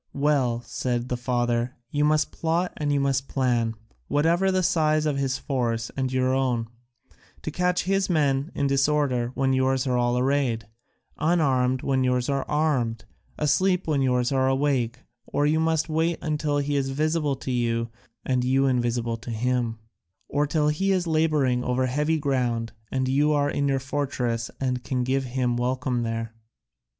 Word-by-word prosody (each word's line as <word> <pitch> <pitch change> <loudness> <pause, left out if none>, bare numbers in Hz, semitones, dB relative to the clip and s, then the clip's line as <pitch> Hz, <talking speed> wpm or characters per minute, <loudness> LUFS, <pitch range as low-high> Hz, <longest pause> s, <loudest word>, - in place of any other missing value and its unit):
"Well," 135 -5 +1
said 120 +1 -2
the 125 - 0
father, 120 0 -1 0.2
"you 145 0 +1
must 150 0 +2
plot 170 +2 -1
and 145 -1 -1
you 145 - +2
must 135 -1 0
plan, 120 -4 0 0.3
whatever 170 +6 +2
the 185 0 +1
size 155 -3 +2
of 145 -2 0
his 135 -1 0
force 115 -5 -2
and 130 -1 -1
your 130 0 +1
own, 125 -4 0 0.8
to 155 - -3
catch 180 +2 +1
his 195 +1 +1
men 145 -2 +1
in 140 - 0
disorder 140 -3 +1
when 135 -1 +1
yours 130 0 +1
are 125 -2 +1
all 120 0 +1
arrayed, 130 -3 +1 0.5
unarmed 130 -6 +2
when 135 -1 +1
yours 125 0 +1
are 140 -1 0
armed, 125 -8 0 0.3
asleep 180 +5 +2
when 150 -3 +1
yours 125 0 +1
are 130 -1 +2
awake, 130 -3 0 0.3
or 145 - 0
you 155 +2 +2
must 160 -1 +1
wait 160 +1 0 0.2
till 150 -2 0
he 145 0 -1
is 135 -1 0
visible 150 +1 0
to 130 0 -5
you 115 -1 0 0.4
and 125 -1 +1
you 135 +2 +2
invisible 120 -2 0
to 115 +2 -10
him, 120 0 -1 0.5
or 145 +1 0
till 150 0 +1
he 195 +6 0
is 185 -2 +1
labouring 155 -6 +1
over 125 +1 0
heavy 150 +5 0
ground 125 -6 -1 0.2
and 130 -1 0
you 145 +3 +3
are 145 -1 +1
in 140 0 0
your 135 -1 +2
fortress 130 -4 -2
and 125 -2 -1
can 125 +2 -1
give 135 +1 0
him 125 -1 -1
welcome 125 0 -1
there." 115 -1 -3
135 Hz, 170 wpm, -25 LUFS, 125-150 Hz, 0.8 s, you